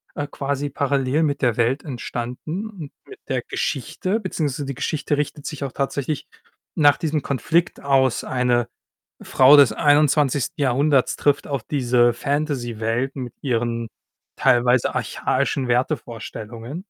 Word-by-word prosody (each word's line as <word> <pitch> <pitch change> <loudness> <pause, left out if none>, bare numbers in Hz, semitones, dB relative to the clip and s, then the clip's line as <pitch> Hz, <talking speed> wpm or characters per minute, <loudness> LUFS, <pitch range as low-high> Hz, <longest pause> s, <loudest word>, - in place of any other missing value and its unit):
äh, 145 0 -3
quasi 140 0 -3
parallel 140 +2 0
mit 145 -2 -1
der 120 -3 +1
Welt 120 +4 +1
entstanden 135 - -5
und 165 -9 -9 0.2
mit 405 - -12
der - - 0
Geschichte 205 +4 -2
beziehungsweise 150 - -3
die 135 -2 -5
Geschichte 150 0 -1
richtet 150 0 -3
sich 150 -3 -5
auch 135 - -3
tatsächlich 140 +1 -3 0.5
nach 145 -2 +5
diesem 155 -2 -1
Konflikt 165 +5 0
aus. 135 -3 +2
Eine 125 -2 +1 0.5
Frau 135 +3 +6
des 140 - +6
21. 145 -2 +2
Jahrhunderts 135 +1 +2
trifft 145 -1 +1
auf 140 -5 -3
diese 120 -4 +2
Fantasy-Welt 130 -3 -2
mit 125 -3 -6
ihren 115 -3 -1 0.5
teilweise 125 0 +3
archaischen 130 -3 -1
Wertevorstellungen. 120 0 -3
140 Hz, 130 wpm, -22 LUFS, 125-145 Hz, 0.5 s, Frau